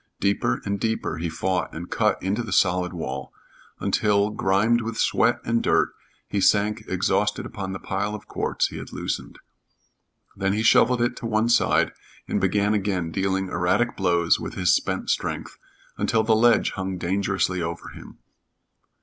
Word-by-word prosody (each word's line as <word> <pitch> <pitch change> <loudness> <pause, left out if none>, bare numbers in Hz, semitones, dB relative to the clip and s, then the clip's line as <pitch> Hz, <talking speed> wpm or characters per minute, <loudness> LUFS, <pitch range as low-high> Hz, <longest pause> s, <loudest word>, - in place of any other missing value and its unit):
Deeper 100 -10 0
and 100 0 -2
deeper 110 -7 -2
he 85 0 -2
fought 90 +2 -1
and 85 +2 -7
cut - - +1
into 100 +5 0
the 110 -4 -6
solid 90 -1 +2
wall, 70 -6 -5 0.5
until, 105 -1 +2
grimed 105 +4 +2
with 115 0 -4
sweat - - +2
and 115 0 +1
dirt, - - +2 0.3
he 100 - -1
sank 105 +3 +2
exhausted 95 +3 0
upon 95 -2 -5
the 95 - -4
pile 100 +3 -3
of 105 - -10
quartz - - -1
he - - -8
had - - -8
loosened. - - -4 1.0
Then 95 0 0
he 110 +2 0
shoveled 120 +2 +4
it 120 - 0
to 115 - -4
one 110 +1 +1
side 120 - +3 0.4
and 100 - -1
began 100 +2 +2
again 95 -5 -1
dealing 95 +1 -1
erratic 90 +8 +1
blows 85 -3 +2
with - - -6
his 90 -2 +3
spent - - 0
strength, - - -3 0.4
until 110 -1 +2
the 110 0 +3
ledge 120 +1 +4
hung 95 -1 -4
dangerously 95 0 0
over 85 0 -5
him. - - -12
100 Hz, 165 wpm, -24 LUFS, 90-110 Hz, 1.0 s, shoveled